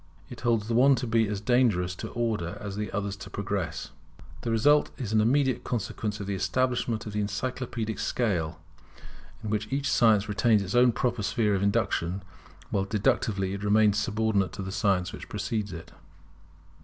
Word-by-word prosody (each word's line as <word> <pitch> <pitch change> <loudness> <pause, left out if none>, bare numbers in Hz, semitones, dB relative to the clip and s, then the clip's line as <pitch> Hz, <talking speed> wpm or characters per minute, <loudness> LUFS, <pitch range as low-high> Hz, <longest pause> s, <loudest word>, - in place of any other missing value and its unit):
It 120 - -9
holds 115 -3 +1
the 115 - -1
one 135 +4 +6
to 125 - -3
be 115 -1 +2
as 100 -1 -3
dangerous 110 -7 +2
to - - -5
Order 110 -8 -2
as 100 -1 -6
the 105 0 -3
other 100 -1 -2
to 100 0 -8
Progress. 100 -5 -3 0.5
This - - -3
result 145 +7 +4
is 110 -5 -4
an 110 - +4
immediate 130 +3 +2
consequence 110 -2 -3
of 100 - -4
the 100 - -2
establishment 120 +1 0
of 105 - -6
the 105 - 0
encyclopædic 110 +1 -3
scale, 85 -9 -1 0.8
in 105 - -3
which 105 +2 -2
each 140 +1 0
science 110 -4 +4
retains 105 0 +3
its 95 - -5
own 125 0 +5
proper 120 0 -1
sphere 105 +1 +1
of 95 - 0
induction, 100 -3 0 0.5
while 95 -1 +1
deductively 100 -1 0
it 100 +1 -5
remains 105 0 +4
subordinate 105 -4 0
to 100 - -5
the 95 - -5
science 95 -1 +1
which - - -9
precedes 105 +1 -2
it. 80 - -9
105 Hz, 180 wpm, -27 LUFS, 100-120 Hz, 0.8 s, one